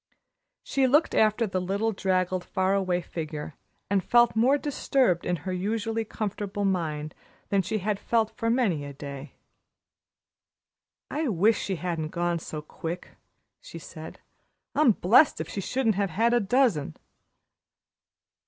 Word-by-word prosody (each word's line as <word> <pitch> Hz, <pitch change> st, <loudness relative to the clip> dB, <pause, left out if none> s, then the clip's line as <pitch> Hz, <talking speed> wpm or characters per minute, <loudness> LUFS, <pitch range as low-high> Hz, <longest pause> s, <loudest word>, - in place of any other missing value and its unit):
She 270 Hz, -1 st, +1 dB
looked 295 Hz, +5 st, +3 dB
after 215 Hz, +2 st, +3 dB
the 190 Hz, -3 st, -2 dB
little, 200 Hz, +5 st, 0 dB
draggled, 185 Hz, -2 st, 0 dB
far 190 Hz, +1 st, 0 dB
away 185 Hz, -2 st, +1 dB
figure, 155 Hz, -2 st, -6 dB, 0.3 s
and 195 Hz, -2 st, +1 dB
felt 240 Hz, +3 st, +4 dB
more 255 Hz, +6 st, +4 dB
disturbed 265 Hz, -, +1 dB
in 180 Hz, -, +1 dB
her 185 Hz, +3 st, -5 dB
usually 225 Hz, +4 st, -1 dB
comfortable 205 Hz, -1 st, -3 dB
mind 155 Hz, -5 st, -1 dB, 0.4 s
than 200 Hz, -1 st, +3 dB
she 215 Hz, +4 st, -2 dB
had 205 Hz, 0 st, -1 dB
felt 225 Hz, 0 st, +1 dB
for 230 Hz, -2 st, -1 dB
many 225 Hz, -, +1 dB
a 140 Hz, 0 st, -7 dB
day. 140 Hz, 0 st, -8 dB, 1.8 s
"I 310 Hz, 0 st, -1 dB
wish 210 Hz, +1 st, +2 dB
she 195 Hz, -, -2 dB
hadn't 170 Hz, -3 st, -3 dB
gone 170 Hz, +1 st, -1 dB
so 155 Hz, -1 st, -7 dB
quick," 165 Hz, +3 st, -6 dB, 0.5 s
she -, -, -10 dB
said. -, -, -10 dB, 0.5 s
"I'm 290 Hz, -7 st, +5 dB
blest 230 Hz, -, +4 dB
if -, -, -3 dB
she 200 Hz, -, -4 dB
shouldn't 240 Hz, +2 st, +1 dB
have 200 Hz, 0 st, 0 dB
had 230 Hz, +8 st, +2 dB
a 240 Hz, -, +4 dB
dozen." 210 Hz, -, +1 dB
195 Hz, 145 wpm, -27 LUFS, 175-225 Hz, 1.8 s, I'm